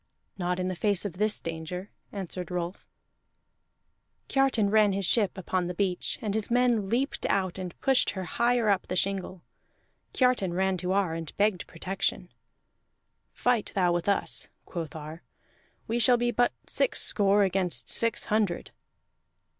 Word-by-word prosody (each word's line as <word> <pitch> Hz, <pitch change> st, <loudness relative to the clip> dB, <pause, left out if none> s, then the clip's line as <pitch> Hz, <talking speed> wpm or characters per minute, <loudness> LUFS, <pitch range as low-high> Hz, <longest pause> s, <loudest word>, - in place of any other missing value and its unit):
"Not 180 Hz, -1 st, -1 dB
in 185 Hz, -, -1 dB
the 185 Hz, -, -2 dB
face 200 Hz, +1 st, +1 dB
of 185 Hz, -2 st, -5 dB
this 215 Hz, 0 st, +3 dB
danger," 165 Hz, +4 st, -6 dB, 0.2 s
answered 185 Hz, -3 st, -5 dB
Rolf. 180 Hz, +1 st, -4 dB, 1.4 s
Kiartan 260 Hz, -7 st, +2 dB
ran 210 Hz, -2 st, +5 dB
his 195 Hz, 0 st, 0 dB
ship 205 Hz, -1 st, +2 dB
upon 185 Hz, -1 st, -1 dB
the 180 Hz, -, -4 dB
beach, 185 Hz, -1 st, -1 dB
and 210 Hz, -2 st, -1 dB
his 215 Hz, -1 st, -1 dB
men 240 Hz, -4 st, +2 dB
leaped 255 Hz, +6 st, -1 dB
out 190 Hz, -1 st, 0 dB
and 180 Hz, -2 st, -6 dB
pushed 265 Hz, -1 st, +3 dB
her 190 Hz, -, -4 dB
higher 235 Hz, +6 st, +1 dB
up 200 Hz, -3 st, +2 dB
the 180 Hz, -, -3 dB
shingle. 190 Hz, -1 st, -2 dB, 0.7 s
Kiartan 250 Hz, -9 st, +2 dB
ran 190 Hz, 0 st, +1 dB
to 180 Hz, +1 st, -2 dB
Ar, 195 Hz, -4 st, +1 dB
and 165 Hz, -2 st, -6 dB
begged 205 Hz, -3 st, +1 dB
protection. 185 Hz, +1 st, -2 dB, 1.0 s
"Fight 245 Hz, -3 st, 0 dB
thou 180 Hz, -3 st, +3 dB
with 175 Hz, +3 st, 0 dB
us," 200 Hz, -, -1 dB, 0.2 s
quoth 165 Hz, -1 st, -6 dB
Ar. 155 Hz, +2 st, -8 dB, 0.7 s
"We 230 Hz, +2 st, 0 dB
shall 245 Hz, +1 st, +5 dB
be 240 Hz, 0 st, +1 dB
but 245 Hz, 0 st, +2 dB
six -, -, +1 dB
score 205 Hz, 0 st, +3 dB
against 185 Hz, -2 st, 0 dB
six 230 Hz, 0 st, +1 dB
hundred." 210 Hz, -5 st, 0 dB
195 Hz, 155 wpm, -28 LUFS, 180-215 Hz, 1.4 s, ran